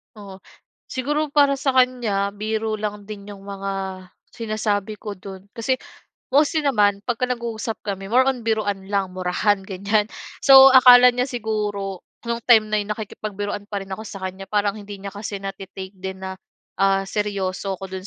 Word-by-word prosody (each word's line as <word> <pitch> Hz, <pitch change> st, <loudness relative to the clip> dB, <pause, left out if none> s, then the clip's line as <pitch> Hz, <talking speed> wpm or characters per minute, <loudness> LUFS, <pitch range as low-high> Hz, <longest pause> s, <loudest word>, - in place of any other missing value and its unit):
Oh, 200 Hz, -2 st, -11 dB, 0.5 s
siguro 295 Hz, +4 st, -1 dB
para 280 Hz, -2 st, +4 dB
sa 270 Hz, -1 st, 0 dB
kanya, 235 Hz, -6 st, +2 dB
biro 215 Hz, +1 st, -2 dB
lang 210 Hz, -1 st, -4 dB
din 200 Hz, -1 st, -9 dB
'yong 200 Hz, -1 st, -10 dB
mga 195 Hz, 0 st, -5 dB, 0.6 s
sinasabi 215 Hz, -2 st, -2 dB
ko 205 Hz, -3 st, -6 dB
do'n, 190 Hz, +1 st, -11 dB
kasi, 235 Hz, +4 st, 0 dB, 0.6 s
mostly 300 Hz, +3 st, +3 dB
naman 205 Hz, -7 st, +3 dB
pagka 245 Hz, +1 st, 0 dB
nag-uusap 230 Hz, -2 st, -3 dB
kami, 195 Hz, -1 st, -4 dB
more 255 Hz, +3 st, +5 dB
on, 260 Hz, -2 st, 0 dB
biruan 205 Hz, -3 st, -1 dB
lang, 195 Hz, -2 st, 0 dB
murahan, 185 Hz, +3 st, +1 dB
ganyan. 200 Hz, +2 st, 0 dB, 0.4 s
So, 270 Hz, 0 st, +10 dB
akala 250 Hz, -1 st, +9 dB
niya 250 Hz, 0 st, +1 dB
siguro, 210 Hz, -5 st, -3 dB, 0.3 s
no'ng 235 Hz, 0 st, -2 dB
time 220 Hz, -3 st, +7 dB
na 215 Hz, -, +1 dB
'yon, 205 Hz, -, -6 dB
nakikipagbiruan 205 Hz, -1 st, -5 dB
pa 200 Hz, -1 st, -2 dB
rin -, -, -17 dB
ako 215 Hz, -, -8 dB
sa 200 Hz, -2 st, -8 dB
kanya, 190 Hz, +1 st, -5 dB
parang 205 Hz, -1 st, +1 dB
hindi 205 Hz, -1 st, -8 dB
niya 200 Hz, 0 st, -7 dB
kasi 205 Hz, 0 st, -5 dB
na-te-take 195 Hz, 0 st, -7 dB
din 190 Hz, 0 st, -7 dB
na, 190 Hz, -, -4 dB, 0.5 s
ah, 195 Hz, 0 st, +3 dB
seryoso 195 Hz, -2 st, -2 dB
ako 190 Hz, -1 st, -8 dB
do'n 190 Hz, +1 st, -6 dB
205 Hz, 165 wpm, -22 LUFS, 195-230 Hz, 0.6 s, So